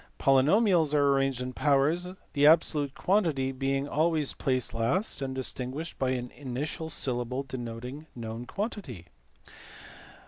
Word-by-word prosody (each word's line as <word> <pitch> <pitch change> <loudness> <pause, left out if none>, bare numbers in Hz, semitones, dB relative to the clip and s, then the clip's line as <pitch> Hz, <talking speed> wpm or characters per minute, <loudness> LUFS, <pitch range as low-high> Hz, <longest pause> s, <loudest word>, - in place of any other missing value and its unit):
Poly 135 -1 +4
nomials 175 -4 +3
are 140 -1 +4
arranged 135 -2 0
in 125 0 -4
powers, 150 +7 +1 0.2
the 145 0 +5
absolute 150 -3 +3
quantity 165 -10 +1
being 135 +1 -1
always 155 -1 +1
placed 130 -2 -1
last 130 - 0
and 135 -1 -3
distinguished 130 +4 -4
by 130 - +1
an 125 -1 -2
initial 145 +4 -5
syllable 125 -2 -1
de 135 -1 -7
noting 125 +6 -7
known 115 0 -6
quantity. 195 - -5
135 Hz, 135 wpm, -28 LUFS, 130-155 Hz, 0.2 s, the